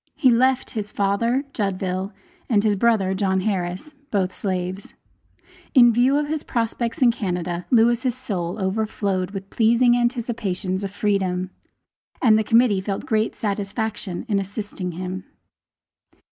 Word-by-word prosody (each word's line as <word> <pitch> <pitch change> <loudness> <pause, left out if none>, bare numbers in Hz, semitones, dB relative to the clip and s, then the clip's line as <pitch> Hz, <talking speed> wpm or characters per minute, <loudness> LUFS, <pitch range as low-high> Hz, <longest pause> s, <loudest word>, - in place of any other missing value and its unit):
He 260 -4 +4
left 260 +2 +2
his 210 -2 -4
father 220 +7 +1
(Judville), 190 -2 -2 0.4
and 210 -4 +3
his 210 -2 +2
brother, 200 -3 +2
John 190 -1 +1
Harris, 185 +6 -3 0.2
both 190 -3 0
slaves. 185 0 -4 0.8
In 240 -3 +7
view 250 +5 +3
of 295 0 0
his 310 0 -2
prospects 230 +1 -1
in 240 - +6
Canada, 180 -5 -3
Lewis' 240 +1 +3
soul 185 -9 -3
overflowed 195 -2 -1
with 195 -1 -8
pleasing 235 +2 +4
anticipations 220 -6 -1
of 195 - -2
freedom, 190 -2 -1 0.7
and 225 -4 +5
the 220 - +3
Committee 225 -3 +3
felt 195 0 -4
great 220 0 0
satisfaction 205 -2 -3
in 205 -4 +1
assisting 195 -2 -5
him. 185 +2 -5
205 Hz, 130 wpm, -23 LUFS, 190-235 Hz, 0.8 s, In